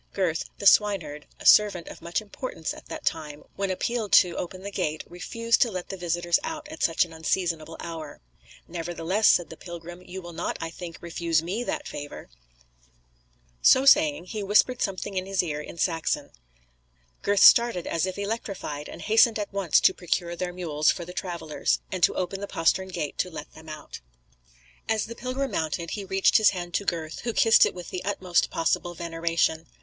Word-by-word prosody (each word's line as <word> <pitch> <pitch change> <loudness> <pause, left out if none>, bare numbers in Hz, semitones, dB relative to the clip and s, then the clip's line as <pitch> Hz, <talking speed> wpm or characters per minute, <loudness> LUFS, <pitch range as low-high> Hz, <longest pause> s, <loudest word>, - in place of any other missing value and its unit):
Gurth, 175 -5 0
the - - -7
swineherd, 185 -8 +3
a - - -11
servant 205 -5 +5
of - - -10
much 170 +5 -2
importance 210 -5 -5
at - - -13
that - - -7
time, 150 -2 -3
when 195 0 -2
appealed 215 +3 -2
to 175 -2 +6
open 185 +1 -5
the 200 - -5
gate, 155 -6 -2
refused 230 +6 -1
to 240 - +4
let 185 -4 -6
the - - -4
visitors 175 -1 +1
out 310 -1 -5
at 315 +1 -9
such 165 +1 +3
an 165 - -14
unseasonable 160 -1 -2
hour. 160 -3 -7 0.5
"Nevertheless," 175 +4 0
said 175 - +4
the 160 - -9
pilgrim, 175 +1 -9
"you 185 +1 -8
will 175 -2 -9
not, - - -3
I 165 - -4
think, 170 -1 -8
refuse 170 -1 0
me 195 +8 -2
that 300 +1 -3
favour." 145 - -8 1.3
So 260 +1 +6
saying, 295 - +5
he 210 +3 -5
whispered 210 +5 +3
something 195 0 -2
in 185 0 -2
his 195 -1 +1
ear 150 -3 -3
in 160 - -10
Saxon. 165 -1 -1 0.9
Gurth 200 -1 +3
started 235 -7 +6
as 165 +2 0
if 185 - -5
electrified, 200 -8 -4
and - - -9
hastened 225 +1 +4
at 205 -1 -4
once 195 -5 +3
to - - +5
procure 175 -1 -2
their 180 +1 -3
mules 155 -4 0
for 175 - 0
the 180 - -9
travellers, 170 -5 -2
and 185 - -3
to - - +4
open 185 +2 -3
the 200 - -4
postern 190 +3 +1
gate 155 -6 -5
to 180 - 0
let 150 -3 -9
them 160 0 -13
out. 155 0 -8 0.9
As 220 -1 +1
the 230 - -7
pilgrim 255 +2 -3
mounted, 165 -1 -2
he 205 - -4
reached 195 0 +3
his 215 - +6
hand 175 -2 -5
to 200 - -1
Gurth, 165 -3 -3
who 235 - -3
kissed 225 0 +6
it - - -6
with 180 -1 -8
the 185 - -4
utmost 185 -3 +1
possible 175 +1 -1
veneration. 165 -1 -1
180 Hz, 190 wpm, -26 LUFS, 165-200 Hz, 1.3 s, to